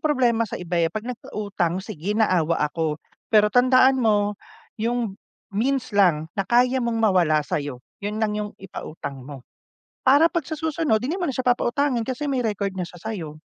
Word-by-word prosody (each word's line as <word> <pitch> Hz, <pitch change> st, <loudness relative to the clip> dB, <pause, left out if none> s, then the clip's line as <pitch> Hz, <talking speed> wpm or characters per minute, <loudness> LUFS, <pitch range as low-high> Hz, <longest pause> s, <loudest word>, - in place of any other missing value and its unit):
problema 245 Hz, -7 st, +2 dB
sa -, -, -4 dB
iba, 175 Hz, -1 st, -2 dB
eh. 165 Hz, -, +3 dB
'Pag 215 Hz, +6 st, -5 dB
nagpautang, 200 Hz, -7 st, -3 dB
sige 205 Hz, 0 st, -4 dB
naawa 175 Hz, -7 st, +2 dB
ako. 150 Hz, 0 st, -1 dB, 0.3 s
Pero 210 Hz, -1 st, +4 dB
tandaan 255 Hz, +1 st, +5 dB
mo 210 Hz, -3 st, +2 dB, 0.5 s
yung 235 Hz, -2 st, -1 dB, 0.4 s
means 255 Hz, +5 st, 0 dB
lang 180 Hz, -7 st, +3 dB
na 200 Hz, -, -2 dB
kaya 250 Hz, +2 st, +3 dB
mong 235 Hz, -1 st, -1 dB
mawala 180 Hz, -9 st, +3 dB
sa'yo, 145 Hz, -4 st, -4 dB, 0.2 s
yun 205 Hz, +1 st, -3 dB
lang 220 Hz, -1 st, 0 dB
yung 210 Hz, 0 st, -3 dB
ipautang 145 Hz, -7 st, -7 dB
mo. 135 Hz, -4 st, -9 dB, 0.6 s
Para 285 Hz, +5 st, +6 dB
'pag 340 Hz, 0 st, 0 dB
sa 315 Hz, -, -3 dB
susunod 315 Hz, -6 st, +1 dB
hindi 255 Hz, +9 st, -2 dB
mo 355 Hz, -5 st, -1 dB
na -, -, -6 dB
siya 255 Hz, -, -3 dB
papautangin 245 Hz, +1 st, +1 dB
kasi 260 Hz, +5 st, -3 dB
may 265 Hz, -3 st, 0 dB
record 200 Hz, -3 st, -2 dB
na 185 Hz, -, -3 dB
siya 175 Hz, 0 st, -8 dB
sa'yo. 165 Hz, -6 st, -6 dB
215 Hz, 180 wpm, -23 LUFS, 175-250 Hz, 0.6 s, Para